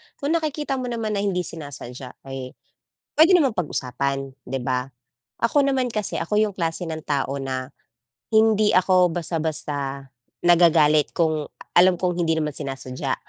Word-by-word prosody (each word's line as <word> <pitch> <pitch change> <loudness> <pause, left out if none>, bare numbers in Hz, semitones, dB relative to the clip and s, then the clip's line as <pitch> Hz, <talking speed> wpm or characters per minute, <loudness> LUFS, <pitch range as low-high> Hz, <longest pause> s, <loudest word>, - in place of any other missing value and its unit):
Kung 285 +2 -3
nakikita 295 -4 -2
mo 250 - -3
naman 225 -3 -3
na - - 0
hindi 195 -3 0
sinasadya 130 -5 -6
ay, 135 -1 -7 0.6
pwede 335 +4 +7
namang 280 -8 +4
pag-usapan, 135 -3 -2 0.2
di 135 +1 -3
ba. 125 0 -1 0.5
Ako 280 +5 +2
naman 270 -2 +1
kasi, 215 -1 -1
ako 170 +5 -2
yung 210 -2 +1
klase 165 0 -1
ng 160 -1 -5
tao 140 -1 -1
na, 130 0 -4 0.6
hindi 220 -1 +4
ako 180 -2 +4
basta-basta 150 -5 -2 0.4
nagagalit 160 -4 +5
kung 155 -3 0 0.3
alam 180 +1 +6
kong 180 0 -1
hindi 160 0 +1
naman 150 -1 -1
sinasadya. 135 -2 -4
165 Hz, 145 wpm, -23 LUFS, 140-210 Hz, 0.6 s, pwede